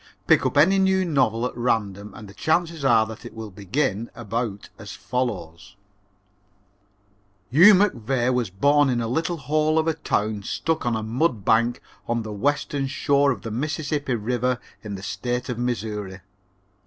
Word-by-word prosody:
Pick - - +4
up - - -3
any 190 +7 +5
new 190 -1 +2
novel 125 -8 +1
at 125 - -4
random 105 -4 -1
and 105 - -10
the 100 - -13
chances 165 +1 0
are 115 -4 +4
that 110 0 -9
it - - -10
will 110 -2 -7
begin 105 +3 -2
about 115 -2 -4
as - - -8
follows: 95 -8 -4 1.8
"Hugh 180 +10 +8
McVey 130 - +1
was 125 -5 0
born 140 +9 +3
in 125 -2 0
a 115 - -2
little 160 +8 -1
hole 155 +1 +1
of 160 0 +2
a 160 - +2
town 105 -6 -1
stuck 160 +7 -2
on 120 - +1
a 110 - -3
mud 115 - 0
bank 115 +2 +2 0.2
on 115 -1 -1
the 110 -1 -6
western 140 +4 -1
shore 140 +1 +2
of 120 - -5
the 115 - -5
Mississippi 145 +1 -2
River 125 +3 -1 0.2
in 105 -2 -5
the 95 - -9
State 120 +6 -3
of 120 -2 -3
Missouri. 105 -5 -3
120 Hz, 165 wpm, -24 LUFS, 110-145 Hz, 1.8 s, Hugh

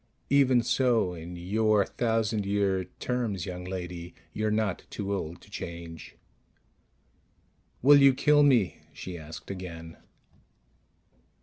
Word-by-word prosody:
Even 130 -4 +5
so, 120 -7 +2
in 85 +1 -8
your 105 +4 +2
thousand 110 -2 0
year 100 -2 0
terms, 115 -8 -2
young 90 -1 -6
lady, 90 -2 -6 0.2
you're 110 0 -1
not 105 -3 0
too 100 -1 -3
old 85 -4 -4
to - - -17
change._ 85 -4 -7 1.7
"Will 140 +1 +8
you 135 -1 +7
kill 150 +2 +4
me?" 125 -10 +3
she 90 - -7
asked 80 +2 -9
again. 85 -3 -8
100 Hz, 115 wpm, -28 LUFS, 90-115 Hz, 1.7 s, Will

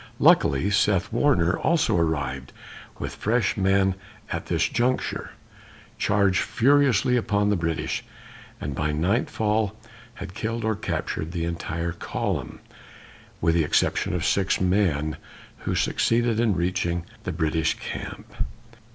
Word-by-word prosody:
Luckily, 70 +10 +4
Seth 100 -2 +2
Warner 100 -12 +3
also 165 - +2
arrived 70 -6 -1 0.4
with - - -5
fresh 115 +2 +1
men 95 -1 +3 0.4
at - - -3
this - - +1
juncture, 125 +2 -1 0.7
charged 100 -3 +2
furiously 130 -1 +3
upon 105 -3 +1
the - - +3
British, 85 -2 -2 0.6
and 70 - -4
by 75 +3 -1
nightfall 105 +4 0 0.4
had 90 - -8
killed 115 +2 -3
or 110 0 +1
captured 85 -4 -3
the 85 -2 -1
entire 85 0 -3
column, - - -3 0.8
with 80 0 +3
the 85 -1 +3
exception 90 +5 +1
of 85 -2 -1
six 95 -1 +2
men, 90 -6 +1 0.5
who - - +1
succeeded 115 -1 +1
in 115 -4 +2
reaching 85 -1 -1 0.2
the - - -4
British 80 -1 0
camp. - - -7
95 Hz, 125 wpm, -25 LUFS, 85-110 Hz, 0.8 s, Luckily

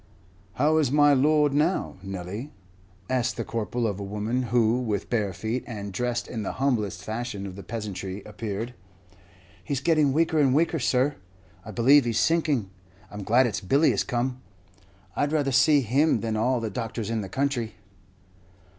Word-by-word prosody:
"How 150 +4 +2
is 145 -5 +2
my 145 0 +5
lord, 150 +1 +3
now, 155 +6 0
Nelly?" 95 +7 -6 0.6
asked 130 -1 0
the 115 - -2
Corporal 115 +1 -2
of 100 -3 -2
a - - -4
woman 105 +5 -2
who, 120 0 +3
with 105 -4 -3
bare 105 -5 +1
feet, 110 +7 -3
and 100 -4 -6
dressed 120 +3 -2
in 115 - -4
the 105 - -3
humblest 120 -8 -1
fashion 110 -2 -4
of 95 -2 -7
the 100 - -8
peasantry, 100 -3 -5
appeared. 105 +2 -5 0.9
"He's 140 +5 -2
getting 155 -1 +3
weaker 160 +2 +2
and 135 -3 +4
weaker, 165 +1 +2
sir; 130 +4 +1 0.5
I - - -10
believe 125 +6 +5
he's 115 -1 0
sinking. 150 - +1 0.4
I'm 105 - -6
glad 120 +6 +4
it's 105 -6 -2
Billy 140 - +3
is - - 0
come; 125 +1 -2 0.7
I'd 145 0 0
rather 145 -3 +1
see 145 +2 +5
him 135 +7 +2
than 110 -1 -2
all 120 +3 +1
the 115 -2 -3
doctors 115 0 -4
in 115 -1 -1
the 95 - -6
country." 130 -2 -1
120 Hz, 170 wpm, -26 LUFS, 105-140 Hz, 0.9 s, my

